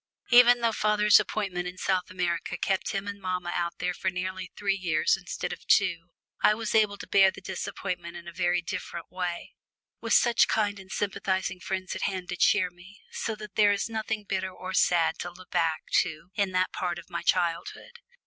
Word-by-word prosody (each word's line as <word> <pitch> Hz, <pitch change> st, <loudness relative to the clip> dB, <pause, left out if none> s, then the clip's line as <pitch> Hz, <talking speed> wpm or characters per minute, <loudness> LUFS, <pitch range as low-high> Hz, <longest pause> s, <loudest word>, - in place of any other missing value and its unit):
Even 245 Hz, 0 st, +7 dB
though 230 Hz, -1 st, +2 dB
father's 210 Hz, -1 st, +4 dB
appointment 185 Hz, -4 st, -2 dB
in 180 Hz, +1 st, -7 dB
South 185 Hz, -1 st, 0 dB
America 175 Hz, -2 st, -2 dB
kept 190 Hz, -1 st, -1 dB
him 195 Hz, 0 st, -3 dB
and 200 Hz, 0 st, -6 dB
mamma 180 Hz, -2 st, -2 dB
out 170 Hz, -1 st, -2 dB
there 180 Hz, 0 st, -1 dB
for 190 Hz, -, -1 dB
nearly 185 Hz, 0 st, -4 dB
three 200 Hz, -1 st, +1 dB
years 170 Hz, -5 st, +1 dB
instead -, -, -5 dB
of -, -, -11 dB
two, 175 Hz, -4 st, +2 dB, 0.3 s
I 210 Hz, -, +5 dB
was 225 Hz, -1 st, -3 dB
able 210 Hz, -2 st, +3 dB
to -, -, -9 dB
bear 195 Hz, -1 st, +6 dB
the 190 Hz, -, -9 dB
disappointment 180 Hz, -2 st, -5 dB
in 170 Hz, -, -11 dB
a -, -, -6 dB
very 175 Hz, 0 st, +1 dB
different 170 Hz, 0 st, -6 dB
way, 180 Hz, -2 st, -4 dB, 0.5 s
with -, -, -1 dB
such 240 Hz, -1 st, +5 dB
kind 205 Hz, -2 st, 0 dB
and 190 Hz, 0 st, -13 dB
sympathising 190 Hz, -2 st, -1 dB
friends 185 Hz, 0 st, -4 dB
at 190 Hz, -, -5 dB
hand 185 Hz, -2 st, -2 dB
to 180 Hz, -, -2 dB
cheer 195 Hz, +1 st, +3 dB
me, 185 Hz, +4 st, -16 dB
so 220 Hz, -, -3 dB
that 210 Hz, -2 st, -10 dB
there 205 Hz, 0 st, +5 dB
is 200 Hz, -, -2 dB
nothing 220 Hz, -1 st, -3 dB
bitter 190 Hz, -2 st, -2 dB
or 185 Hz, 0 st, -7 dB
sad 175 Hz, -2 st, +3 dB
to 175 Hz, -, -4 dB
look 180 Hz, +1 st, -15 dB
back 160 Hz, -1 st, +1 dB, 0.2 s
to 165 Hz, +4 st, -3 dB
in 200 Hz, -1 st, 0 dB
that 185 Hz, 0 st, +1 dB
part 175 Hz, -2 st, -2 dB
of 170 Hz, -, -10 dB
my -, -, -3 dB
childhood. 180 Hz, -, -1 dB
185 Hz, 200 wpm, -27 LUFS, 175-205 Hz, 0.5 s, Even